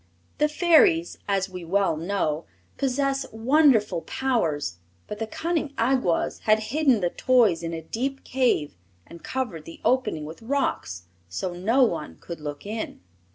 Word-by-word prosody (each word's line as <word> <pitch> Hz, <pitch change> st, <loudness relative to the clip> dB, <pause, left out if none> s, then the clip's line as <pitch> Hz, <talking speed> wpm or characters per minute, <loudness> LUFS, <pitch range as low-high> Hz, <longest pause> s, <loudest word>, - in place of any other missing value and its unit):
The 300 Hz, -, +3 dB
Fairies, 300 Hz, -, +4 dB
as 195 Hz, -1 st, +1 dB
we 180 Hz, -2 st, -8 dB
well 190 Hz, 0 st, +1 dB
know, 165 Hz, -2 st, -1 dB, 0.3 s
possess 275 Hz, 0 st, 0 dB
wonderful 225 Hz, -, +3 dB
powers; 155 Hz, -, -1 dB, 0.3 s
but 210 Hz, -, -7 dB
the 225 Hz, -, -2 dB
cunning 315 Hz, +1 st, -2 dB
Awgwas 230 Hz, -7 st, +1 dB
had 215 Hz, 0 st, +5 dB, 0.2 s
hidden 280 Hz, -8 st, +3 dB
the 175 Hz, -1 st, 0 dB
toys 230 Hz, -10 st, +3 dB
in 165 Hz, 0 st, -4 dB
a 165 Hz, -1 st, -5 dB
deep 270 Hz, -, -3 dB
cave 250 Hz, -, +1 dB, 0.3 s
and 170 Hz, 0 st, -13 dB
covered 220 Hz, -13 st, -3 dB
the 165 Hz, -, -10 dB
opening 250 Hz, -12 st, +1 dB
with 160 Hz, +6 st, -9 dB
rocks, 225 Hz, -, -2 dB, 0.3 s
so 175 Hz, -, -3 dB
no 225 Hz, +10 st, +3 dB
one 165 Hz, -, -1 dB
could 170 Hz, -, -8 dB
look 145 Hz, +1 st, -6 dB
in. 220 Hz, +2 st, -5 dB
210 Hz, 150 wpm, -25 LUFS, 165-265 Hz, 0.3 s, had